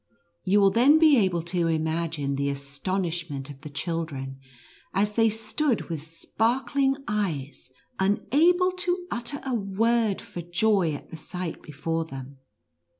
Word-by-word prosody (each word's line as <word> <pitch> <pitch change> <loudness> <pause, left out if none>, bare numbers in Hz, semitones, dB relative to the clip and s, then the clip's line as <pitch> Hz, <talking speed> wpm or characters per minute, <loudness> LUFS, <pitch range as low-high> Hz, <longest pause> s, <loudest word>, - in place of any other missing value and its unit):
You 200 +2 +4
will 195 -1 +6
then 260 +9 +6
"be 315 -2 +6
able 185 -6 +2
to 170 -1 0
im 160 -1 +1
agine 160 -3 -1
the 140 +1 0
astonishment 145 +1 -3
of 140 0 -13
the 155 - -8
children, 140 -4 -4 0.6
as 205 +2 +2
they 225 +1 +4
stood 225 +3 -1
with 160 -3 -3
sparkling 250 - 0
eyes, 160 -12 -2 0.3
unable 310 - +3
to 360 0 -2
utter 240 +5 -4
a 265 - -1
word, 220 0 +1
for 175 - -7
joy 175 -2 +2
at - - -11
the 165 - -7
sight 180 +2 -5
before 165 +3 -3
them. 135 -2 -9
180 Hz, 145 wpm, -26 LUFS, 155-230 Hz, 0.6 s, will